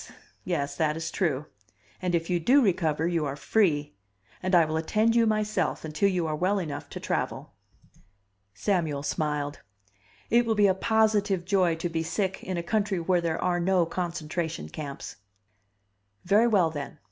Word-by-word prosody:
Yes, 145 -6 -2
that 155 -1 +1
is 165 - -4
true. 150 -6 -1 0.6
And 180 -1 0
if 165 0 -1
you 175 -1 +1
do 255 - +5
recover, 165 -5 +1
you 170 -2 0
are 140 - -3
free. 150 - +1 0.5
And 185 0 +1
I 170 -2 +6
will 155 0 -3
attend 215 +8 +1
you 230 -1 +4
myself, 215 -7 0
until 155 +6 +1
you 180 -3 0
are 155 -1 -1
well 185 +6 +1
enough 150 -6 -5
to - - -7
travel." - - -3 1.0
Samuel 155 - 0
smiled. 150 -1 -2 0.7
"It 235 +1 +4
will 225 - +2
be 210 -1 +4
a 190 - +5
positive 205 -2 +1
joy 185 -3 +2
to 165 +2 -3
be 165 -1 -2
sick 190 +3 -2
in 185 -1 -3
a 170 - -2
country 205 0 0
where 175 +1 +1
there 165 -1 -1
are 180 -1 +1
no 180 0 +2
concentration 165 - -3
camps!" 140 - -7 1.1
"Very 210 +5 +4
well, 190 -8 +3
then. 145 -3 -6
175 Hz, 170 wpm, -27 LUFS, 155-200 Hz, 1.1 s, I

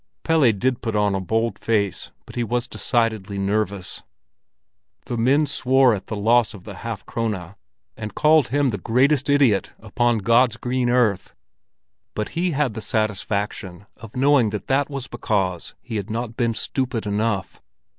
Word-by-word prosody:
Pelle 160 -7 +4
did 120 +4 -1
put 115 -2 -3
on 105 -1 +2
a 95 - -1
bold 110 +2 -1
face, 105 -4 -1 0.2
but - - -12
he 120 - 0
was 120 +1 -1
decidedly 110 -6 -1
nervous. 100 -1 -1 1.0
The 120 - -3
men 135 +6 +3
swore 130 -2 +3
at 100 -3 -5
the 110 - -4
loss 110 +1 +2
of 95 - -12
the 100 -2 -9
half 115 -1 -6
krone, 105 -6 -3 0.4
and 105 -1 -7
called 155 -3 +4
him 140 0 +1
the 100 - -4
"greatest 135 +7 +2
idiot 135 -9 +3
upon 120 +2 0
God's 115 +2 +3
green 125 0 -1
earth"; 120 -6 +1 0.8
but 105 - -2
he 175 +2 -1
had 145 -6 0
the 110 - -6
satisfaction 100 -4 -2
of 110 -1 -13
knowing 135 -4 +4
that 105 0 -5
that 140 +2 +1
was 140 -3 -4
because 95 -8 -2
he 110 - -4
had 100 +1 -4
not 115 +1 -4
been 115 -2 0
stupid 125 -2 -2
enough. 105 -2 -2
115 Hz, 165 wpm, -22 LUFS, 105-125 Hz, 1.0 s, Pelle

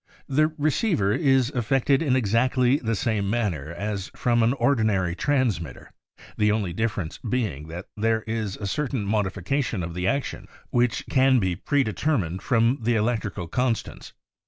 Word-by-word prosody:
The 150 +3 +3
receiver 150 - +1
is 135 -4 +2
affected 135 +3 +1
in 140 -6 +2
exactly 125 +3 +2
the 115 -5 -2
same 105 -3 -1
manner 95 - -1
as 100 +1 -4
from 120 -1 +2
an 115 +2 +3
ordinary 110 -10 +1
transmitter, 105 - -1 0.5
the 105 0 +3
only 105 -5 -1
difference 100 -5 -2
being 105 - -2
that 85 +4 -7
there 110 +1 +1
is 110 -3 -3
a 100 - -5
cer 150 +9 -1
tain 125 -6 -3
modification 105 +2 -1
of 85 0 -5
the 90 +2 -2
action 140 +6 -2 0.2
which 120 -4 +1
can 130 0 +4
be 95 -6 0
predetermined 110 - 0
from 120 +2 +2
the 115 +1 +1
electrical 105 -5 -1
constants. 125 +5 -2
115 Hz, 150 wpm, -25 LUFS, 95-130 Hz, 0.5 s, can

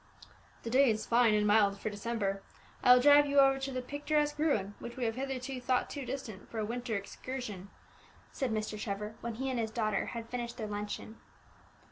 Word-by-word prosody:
"The 230 - -4
day 265 +1 +5
is 215 -1 0
fine, 235 -2 +4
and 210 0 +2
mild 205 -1 +4
for 215 - -3
December; 205 -2 -2 0.4
I 250 - +7
will 250 0 +8
drive 290 0 +7
you 285 0 0
over 270 0 +5
to 270 0 -3
the 255 -1 -3
picturesque 295 +2 -1
ruin 215 -11 +1
which 240 +1 -8
we 250 - -1
have 225 - 0
hitherto 260 0 -4
thought 250 0 0
too 280 -4 -5
distant 240 -7 -6
for 230 - -7
a 215 - 0
winter 240 +1 -3
excursion," 205 -1 -6 0.6
said 265 -3 -2
Mr. 215 -1 -2
Trevor, 210 0 -4
when 235 -1 -4
he 265 +4 -3
and 250 - -1
his 225 -1 -1
daughter 215 -3 -1
had 230 -2 -6
finished 240 -1 -4
their 220 - -3
luncheon. 210 +1 -5
235 Hz, 200 wpm, -32 LUFS, 215-265 Hz, 0.6 s, will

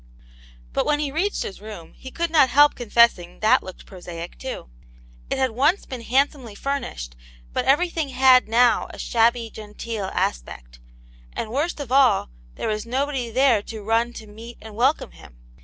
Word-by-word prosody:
But - - 0
when 295 - +2
he 295 -2 -2
reached 370 +8 -1
his 195 - -8
room 210 -6 -10
he 260 - -11
could 335 +4 -3
not 295 -5 +5
help 290 +3 +6
confessing 235 -7 +2
that 215 - +4
looked 185 - -11
prosaic, 175 -2 -9
too. 260 - -6 0.6
It - - -1
had 260 -2 +1
once 290 - +1
been 255 -3 -7
hrjidsomely 255 -3 0
furnished, 60 - -4 0.4
but - - -1
everything 320 +1 +1
had 255 -1 +5
now 235 0 +3
a - - -11
shabby 230 0 +1
genteel 215 0 -6
aspect; - - -4 0.5
and 220 - -4
worst 300 +6 -1
of 275 -4 -6
all, 260 - +4 0.2
there - - -4
was 215 -1 -2
nobody 265 -1 -2
there 245 -2 +3
to 215 0 -9
run 225 +3 +1
to 220 - -9
meet 225 +3 -11
and 220 -1 -11
welcome 260 +7 +1
him. - - -16
235 Hz, 170 wpm, -23 LUFS, 215-275 Hz, 0.6 s, help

